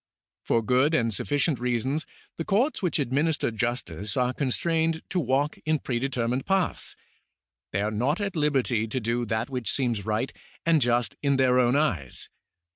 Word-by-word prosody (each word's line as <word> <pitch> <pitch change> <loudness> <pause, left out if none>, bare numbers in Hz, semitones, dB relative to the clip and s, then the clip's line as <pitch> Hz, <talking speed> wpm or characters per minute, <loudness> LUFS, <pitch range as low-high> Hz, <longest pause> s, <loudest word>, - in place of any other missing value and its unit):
For 115 - +1
good 130 +7 +3
and 115 -5 +1
sufficient 145 +4 0
reasons 125 +5 -1 0.3
the 165 - -2
courts 230 - +1
which 180 -4 +1
administer 145 +1 +1
justice 110 - -2
are 125 0 +2
constrained 160 +4 0
to 185 - 0
walk 140 0 0
in 155 0 +2
predetermined 125 -1 -1
paths. 190 -2 0 0.8
They 100 - 0
are 105 - 0
not 125 - 0
at 200 -2 -2
liberty 135 -7 +1
to 120 +4 -2
do 120 +1 -1
that 110 +4 -1
which 125 -4 -1
seems 120 -6 0
right 110 +5 -1 0.3
and 165 -2 +4
just 120 -3 +1
in 140 -1 +2
their 130 -1 +4
own 125 +1 +3
eyes. 90 - -1
130 Hz, 160 wpm, -26 LUFS, 120-150 Hz, 0.8 s, and